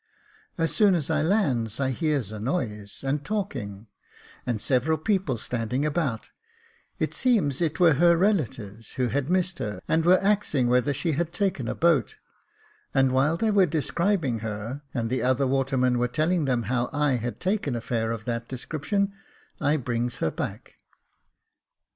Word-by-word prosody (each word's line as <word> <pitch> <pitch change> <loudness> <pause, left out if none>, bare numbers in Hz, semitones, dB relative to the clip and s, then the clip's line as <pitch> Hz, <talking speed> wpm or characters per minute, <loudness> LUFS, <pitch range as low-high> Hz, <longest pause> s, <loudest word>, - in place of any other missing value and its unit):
As 165 -1 0
soon 205 -4 +5
as 165 -2 -1
I 155 -1 +2
lands 140 - +1
I 135 -1 +1
hears 140 - -1
a 110 - -6
noise 105 - -3
and 140 +2 -1
talking, 130 - -4 0.6
and 120 -3 0
several 135 +7 +1
people 180 - 0
standing 125 +4 -2
about; 145 -7 -1 0.7
it - - -1
seems 200 - +2
it 165 +1 0
were 170 -3 +6
her 170 +4 +4
relatives, 120 - -1
who 125 -2 0
had 140 +4 -1
missed 185 0 0
her, 105 -1 -4
and 160 0 +2
were 180 +2 +6
axing 195 -11 +2
whether 125 +3 +3
she 160 +5 -1
had 165 +3 -1
taken 175 - -1
a - - -2
boat; 165 -3 +2 0.8
and 135 -1 +4
while 140 +5 +2
they 220 +4 +1
were 195 -3 +4
describing 165 - 0
her, 110 +5 -5
and 115 -2 -2
the 130 - 0
other 130 +2 +2
watermen 130 -2 +1
were 125 - +2
telling 155 +6 +1
them 125 -3 +1
how 125 +1 -1
I 145 -2 +1
had 120 +1 -4
taken 185 - -1
a - - -1
fare 115 -1 -1
of 115 -1 -4
that 115 -1 -3
description, 165 - -2 0.5
I 150 +1 +2
brings 120 -2 -2
her 80 - 0
back. - - -6
135 Hz, 165 wpm, -26 LUFS, 120-170 Hz, 0.8 s, were